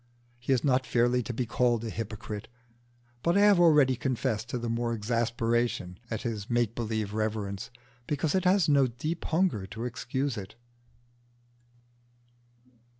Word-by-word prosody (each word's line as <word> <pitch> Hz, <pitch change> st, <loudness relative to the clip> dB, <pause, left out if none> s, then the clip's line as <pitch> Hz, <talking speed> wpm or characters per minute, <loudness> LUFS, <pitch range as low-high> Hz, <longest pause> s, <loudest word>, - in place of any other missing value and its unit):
He 125 Hz, +2 st, -3 dB
is 130 Hz, -3 st, +3 dB
not 130 Hz, -2 st, +2 dB
fairly 120 Hz, +1 st, +2 dB
to 115 Hz, -, -4 dB
be 120 Hz, +1 st, -2 dB
called 120 Hz, 0 st, +1 dB
a 110 Hz, -, -3 dB
hypocrite, 105 Hz, -1 st, -6 dB, 0.7 s
but 170 Hz, +7 st, +2 dB
I -, -, +5 dB
have 205 Hz, -3 st, +6 dB
already 150 Hz, -6 st, +5 dB
confessed 125 Hz, -3 st, -2 dB
to 125 Hz, -, -2 dB
the 120 Hz, 0 st, -4 dB
more 115 Hz, 0 st, -1 dB
exasperation 115 Hz, -3 st, -1 dB
at 110 Hz, -, -3 dB
his 110 Hz, -3 st, -4 dB
make 120 Hz, -2 st, +1 dB
believe 110 Hz, -3 st, -2 dB
reverence, 105 Hz, -1 st, -2 dB, 0.4 s
because 145 Hz, +1 st, 0 dB
it 185 Hz, -1 st, +1 dB
has 185 Hz, -2 st, +4 dB
no 140 Hz, -3 st, +4 dB
deep 155 Hz, +8 st, -4 dB
hunger 160 Hz, -, +1 dB
to 110 Hz, +3 st, -6 dB
excuse 130 Hz, +1 st, -2 dB
it. 95 Hz, 0 st, -7 dB
120 Hz, 150 wpm, -29 LUFS, 110-135 Hz, 0.7 s, have